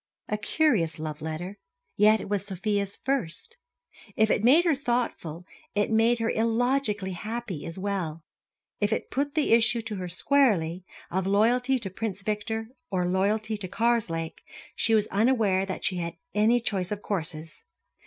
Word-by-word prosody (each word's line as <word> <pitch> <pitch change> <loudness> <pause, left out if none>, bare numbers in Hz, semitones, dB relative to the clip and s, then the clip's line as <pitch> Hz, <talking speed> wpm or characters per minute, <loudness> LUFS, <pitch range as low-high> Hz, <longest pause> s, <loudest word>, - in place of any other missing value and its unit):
A 210 - -1
curious 210 - +2
love 155 -1 -5
letter; 165 +5 -5 0.4
yet 215 +1 +5
it - - -6
was 200 -1 -1
Sofia's 200 +1 -1
first. 270 - -2 0.6
If 220 0 +3
it 210 - +1
made 295 +9 +6
her 335 - +4
thoughtful, 235 - -2 0.3
it 205 +2 +1
made 225 +2 +4
her 230 0 0
illogically 225 -3 +1
happy 210 -3 -5
as 165 - -7
well. 185 -5 -3 0.6
If 205 0 +1
it 220 - -2
put 280 +2 -1
the 310 - +2
issue 235 +1 +4
to 215 -2 -5
her 180 -1 -4
squarely, 185 - +2 0.3
of 190 +1 0
loyalty 245 +6 +3
to 205 -6 -6
Prince 200 -1 -4
Victor 220 +2 -2 0.2
or 180 -1 0
loyalty 210 +4 +1
to 195 -2 -5
Karslake, 180 -7 0 0.3
she 225 +1 +2
was 210 -1 +3
unaware 205 -3 +2
that 190 - -5
she 180 0 0
had 170 -1 -4 0.2
any 220 +3 +4
choice 195 -5 -2
of 205 0 -4
courses. 165 - -4
210 Hz, 160 wpm, -27 LUFS, 185-230 Hz, 0.6 s, made